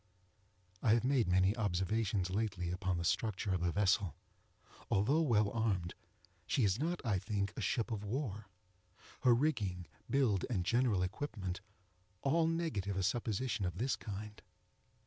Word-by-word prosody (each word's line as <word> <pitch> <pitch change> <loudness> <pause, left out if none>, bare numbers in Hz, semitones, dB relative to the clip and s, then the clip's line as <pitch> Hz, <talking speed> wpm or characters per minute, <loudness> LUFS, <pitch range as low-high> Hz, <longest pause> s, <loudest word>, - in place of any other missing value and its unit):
I 110 - +4
have 120 - +1
made 130 -4 +2
many 95 +3 +3
observations 100 -1 0
lately 95 -4 -1
upon 90 0 -1
the 85 - -2
structure 100 +1 0
of 90 - 0
the 90 0 +1
vessel. 100 -3 +2 0.7
Although 125 +11 +3
well 110 -9 +3
armed, 100 -7 0 0.5
she 135 - +2
is 100 +2 +2
not, 165 -1 -2
I 105 -5 +1
think, 100 0 -2
a - - -4
ship 115 +4 0
of 105 -2 -3
war. 105 -2 -3 0.7
Her 125 -2 +5
rigging, 105 - 0 0.2
build, 120 -9 +2
and 95 -8 -1
general 115 -4 +2
equipment, 95 -3 -4 0.6
all 160 +4 +3
negative 155 - -1
a 95 - 0
supposition 115 +1 -1
of 90 -1 -2
this 130 +5 +1
kind. 105 0 -7
105 Hz, 145 wpm, -35 LUFS, 95-120 Hz, 0.7 s, Her